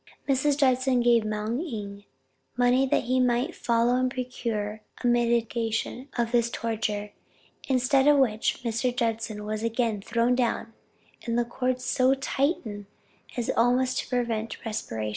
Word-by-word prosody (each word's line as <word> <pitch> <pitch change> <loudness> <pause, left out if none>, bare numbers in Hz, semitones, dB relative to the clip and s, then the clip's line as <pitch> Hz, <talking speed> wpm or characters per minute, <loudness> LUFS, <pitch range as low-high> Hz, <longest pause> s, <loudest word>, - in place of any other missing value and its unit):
Mrs. 275 +1 +2
Judson 260 -2 +3
gave 235 -2 +4
Moung 215 +4 -2
Ing 205 - -6 0.5
money 250 +2 +3
that - - +1
he 255 +2 +1
might 250 +6 +1
follow 235 +1 +2
and 255 0 +1
procure 230 -4 -4 0.2
a - - -3
mitigation 235 +1 0
of 235 -1 0
this 235 -1 +2
torture, 215 -3 -3 0.6
instead 265 +1 +3
of 295 -1 +6
which, 230 -3 +1
Mr. 240 +1 -1
Judson 225 -3 -2
was 215 0 -3
again 230 -2 0
thrown 235 +3 +1
down, 235 -2 -1 0.5
and 230 0 0
the 240 - +2
cords 255 +1 -2
so 260 +1 +3
tightened 265 - -2 0.5
as 240 - 0
almost 250 +2 +2
to - - -5
prevent 230 -3 -2
respiration. 115 - -3
235 Hz, 140 wpm, -27 LUFS, 225-255 Hz, 0.6 s, of